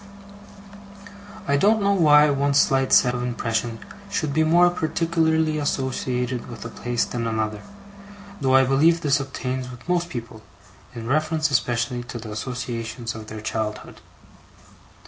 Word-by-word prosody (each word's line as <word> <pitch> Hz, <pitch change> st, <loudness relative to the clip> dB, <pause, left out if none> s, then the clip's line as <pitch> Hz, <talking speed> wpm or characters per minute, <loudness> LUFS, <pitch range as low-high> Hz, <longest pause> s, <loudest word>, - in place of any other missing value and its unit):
I 140 Hz, -, +2 dB
don't 215 Hz, +8 st, +3 dB
know 200 Hz, -1 st, +2 dB
why 150 Hz, -5 st, +5 dB
one 140 Hz, 0 st, +1 dB
slight 135 Hz, -1 st, +3 dB
set 125 Hz, -1 st, +5 dB
of 125 Hz, -, -3 dB
impressions 115 Hz, -1 st, -2 dB, 0.3 s
should 155 Hz, -7 st, -2 dB
be 160 Hz, +2 st, +3 dB
more 175 Hz, +3 st, +5 dB
particularly 160 Hz, -2 st, 0 dB
associated 130 Hz, -3 st, -2 dB
with 115 Hz, -3 st, -9 dB
a -, -, -5 dB
place 120 Hz, 0 st, -2 dB
than 115 Hz, -1 st, -3 dB
another, 110 Hz, -2 st, -2 dB, 0.8 s
though 130 Hz, -1 st, +3 dB
I 135 Hz, -, +6 dB
believe 155 Hz, +6 st, +3 dB
this 145 Hz, -2 st, +2 dB
obtains 130 Hz, -1 st, -4 dB
with 125 Hz, -1 st, -12 dB
most 175 Hz, -1 st, 0 dB
people, 115 Hz, -7 st, -7 dB, 0.5 s
in 115 Hz, -1 st, -6 dB
reference 155 Hz, +3 st, 0 dB
especially 120 Hz, -2 st, 0 dB
to 120 Hz, -, -7 dB
the 110 Hz, -2 st, -8 dB
associations 115 Hz, 0 st, -5 dB
of 110 Hz, -1 st, -9 dB
their 110 Hz, 0 st, -7 dB
childhood. 110 Hz, 0 st, -4 dB
130 Hz, 145 wpm, -23 LUFS, 115-155 Hz, 0.8 s, I